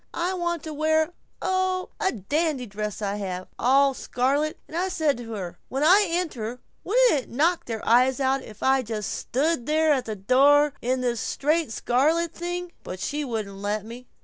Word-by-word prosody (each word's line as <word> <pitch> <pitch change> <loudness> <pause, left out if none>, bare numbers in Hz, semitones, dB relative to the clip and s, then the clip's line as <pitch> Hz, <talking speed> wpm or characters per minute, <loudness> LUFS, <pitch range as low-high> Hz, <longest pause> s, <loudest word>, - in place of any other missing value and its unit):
I 355 +2 0
want 345 -3 -2
to 315 - -6
wear, 315 +2 +1 0.3
oh, 370 0 0
a 380 - +1
dandy 285 - -1
dress 210 0 -5
I 200 0 -1
have 185 -2 -4
all 275 +2 +4
scarlet 280 +5 0
and 315 - -10
I 365 +3 0
said 315 -5 +1
to 230 -2 -7
her, 185 -5 -6
'When 270 +2 -1
I 385 +5 +6
enter 255 -9 -2 0.2
wouldn't - - +4
it - - -17
knock 325 +7 +1
their 225 -2 -5
eyes 255 +3 +4
out 270 0 +1
if 215 -4 -11
I 265 0 +4
just 215 -3 -4
stood 280 -1 -1
there 310 0 +3
at 265 -3 -1
the 220 - -4
door 280 +8 +4
in 255 +1 0
this 240 -2 -1
straight 305 -1 0
scarlet 310 +9 +1
thing?' 350 0 -4
But 185 - -7
she 295 +8 -2
wouldn't 215 -6 -4
let 205 +1 -2
me." 240 +2 -10
275 Hz, 185 wpm, -25 LUFS, 230-325 Hz, 0.3 s, I